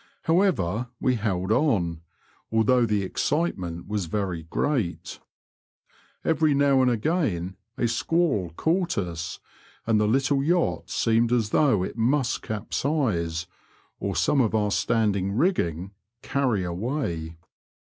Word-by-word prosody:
However, 125 - +1
we 130 - +2
held 100 -4 -1
on, 90 - +1 0.5
although 115 +2 +3
the 105 -2 +1
excitiement 95 - -2
was 105 -4 -2
very 90 -2 -2
great. 95 - -2 1.1
Every 155 -2 +3
now 140 -1 +4
and 130 - +4
again 110 - -1 0.2
a 120 - +1
squall 120 - +1
caught 175 - 0
us, 85 -3 -4 0.5
and 110 -2 +2
the 105 - +2
little 135 +4 +2
yacht 170 +4 0
seemed 115 +1 +2
as 115 -3 +1
though 120 -11 +3
it 110 - -5
must 125 +2 +1
capsize, 105 - -1 0.5
or - - -3
some 140 - +3
of 110 -2 +1
our 105 -1 +1
standing 100 -3 +1
rigging 95 - 0 0.3
carry 125 -9 0
away. 85 - -3
110 Hz, 120 wpm, -25 LUFS, 95-140 Hz, 1.1 s, now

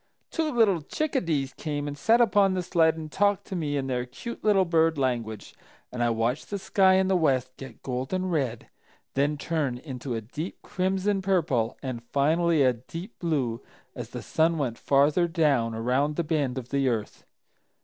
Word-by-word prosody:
Two 320 -2 -1
little 215 - +3
Chicadees 165 - -1
came 145 -2 -4
and 145 - -4
sat 225 +10 +3
upon 200 -3 +4
the 180 - -1
sled 165 -2 +3
and 155 -1 -7
talked 205 0 +1
to 190 - -6
me 150 -4 -1
in 135 - -1
their 125 -2 -1
cute 235 - -8
little 200 -3 +4
bird 165 -2 +2
language, 120 -5 -2 0.4
and 125 - -4
I 120 - +3
watched 115 +5 -1
the 205 - -2
sky 190 -1 +3
in 190 0 +3
the 190 - +2
west 130 -7 +1
get 135 - -11
golden 130 +9 -2
red, 130 -8 -2 0.5
then 145 +2 +1
turn 145 -5 -1
into 125 -2 -5
a 115 - -3
deep 150 - -6
crimson 190 +2 0
purple 155 -12 +1
and 130 -3 -4
finally 155 +4 +2
a 130 -1 +4
deep 165 - -9
blue, 135 -9 -1 0.3
as - - -7
the - - -7
sun 165 +1 +1
went 125 -6 -2
farther 145 +5 +3
down 145 -9 +1
around 130 +6 0
the 170 - 0
bend 145 -5 -1
of 125 -1 -6
the 140 -1 +1
earth. 110 -3 -3
150 Hz, 180 wpm, -27 LUFS, 130-180 Hz, 0.5 s, upon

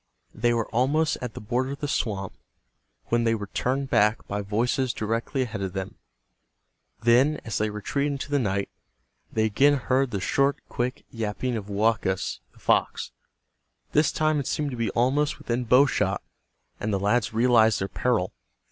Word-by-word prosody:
They 120 +2 +1
were 115 -2 0
almost 145 +7 +1
at 125 -3 -5
the - - -5
border 125 +5 -1
of 140 - -9
the 145 - -2
swamp 100 -8 -2 0.8
when 120 0 +2
they 115 -1 +2
were 105 -3 -6
turned 135 +2 -1
back 110 -3 +3
by 100 +1 -2
voices 120 +5 0
directly 115 +5 -1
ahead 115 -4 -5
of 95 -2 -3
them. 95 -1 -4 1.1
Then, 130 +6 +4
as 110 - -2
they 110 0 +1
retreated 140 +8 -1
into 140 +1 -5
the 145 - +3
night, 100 -4 -1 0.6
they 110 0 +1
again 135 +7 +4
heard 130 0 +1
the 100 - -2
short, 140 +8 +2
quick 125 +1 -3
yapping 115 +2 -2
of 105 -2 -5
Woakus, 100 -2 0
the - - -26
fox. - - +1 0.8
This 150 0 +3
time 155 -1 +1
it 140 - -3
seemed 150 -2 -1
to - - -4
be 115 -1 -1
almost 140 +5 +1
within 120 +1 -2
bow 125 +4 +6
shot, 140 - 0 0.6
and 105 - -2
the 100 - +1
lads 105 +3 +1
realized 115 -1 +4
their 95 - -1
peril. 115 -4 0
120 Hz, 175 wpm, -26 LUFS, 105-135 Hz, 1.1 s, bow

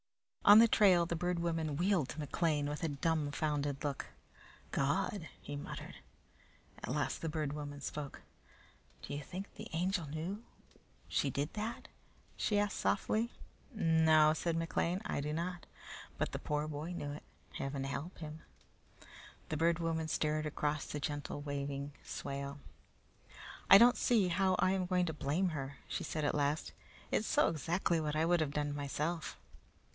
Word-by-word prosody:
On 205 +1 +10
the 230 +1 +9
trail 190 -6 +5
the 170 - -2
Bird 180 +2 0
Woman 165 -3 -1
wheeled 175 -5 +2
to 155 - -6
McLean 150 0 0
with 150 +3 -4
a - - +2
dumbfounded 145 -1 -1
look. 145 -2 -2 0.6
"God!" 170 +5 0 0.2
muttered 145 0 -6
he. - - -15 0.8
At - - -4
last - - -1
the 165 - -1
Bird 150 -2 -2
Woman 145 -1 -5
spoke. 145 0 -5 0.8
"Do - - -5
you 145 - -3
think 185 +7 -7
the - - -8
Angel 175 0 0
knew 170 +9 -4 0.6
she 140 - +1
did 140 +4 -2
that?" 215 +2 -4 0.5
she 210 - +1
asked 205 -1 +1
softly. 220 +3 +1 0.4
"No," 160 -4 +5
said 165 +1 -1
McLean; 170 +3 0
"I - - -1
do 150 +1 -2
not. 175 +2 -3 0.5
But - - -1
the - - -3
poor 150 0 -1
boy 155 +3 -4
knew 145 -4 -4
it. 145 - -7 0.3
Heaven 135 0 -3
help 140 +6 -4
him!" 155 0 -7 1.1
The 155 - -1
Bird 165 +1 +3
Woman 165 -2 -1
stared 155 0 0
across 150 0 -1
the 150 - -4
gently 145 0 -3
waving 140 0 -4
swale. 140 0 -5 1.1
"I 195 - +12
don't 240 +3 +7
see 215 -7 +3
how 185 +1 +3
I 185 - +3
am 190 -1 0
going 180 -1 +2
to 160 - -2
blame 155 +6 0
her," 140 -3 -5
she - - -3
said 155 -2 -2
at - - +2
last. 145 +1 0 0.4
"It's - - +1
so - - +4
exactly 165 +1 0
what 150 -1 -1
I 155 +1 +2
would 175 +1 +3
have 155 -3 0
done 145 0 -1
myself." 150 - -2
155 Hz, 160 wpm, -35 LUFS, 145-175 Hz, 1.1 s, I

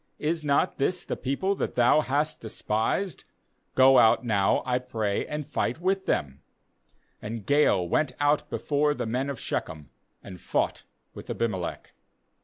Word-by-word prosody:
is 160 +1 -2
not 140 -1 +1
this 175 +6 0
the - - -3
people 140 +9 -1
that - - -3
thou 125 +5 +4
hast 150 +2 -1
despised? 110 - -2 0.5
go 130 0 +7
out 115 +2 +4
now, 100 -4 +2
I 125 -1 +1
pray, 110 -5 -2
and 150 -1 -4
fight - - -2
with 190 +2 -1
them' 70 -1 -1 0.8
39And 110 -1 -6
Gaal 145 -11 +3
went 130 - 0
out 145 +1 +1
bef - - -7
ore 145 +1 +3
the - - -3
men 125 +5 -2
of 135 -4 -5
Shechem, 75 -3 -4 0.3
and 90 -3 -10
fought - - -1 0.3
with - - -11
Abimelech. 100 -7 -3
130 Hz, 155 wpm, -27 LUFS, 110-150 Hz, 0.8 s, go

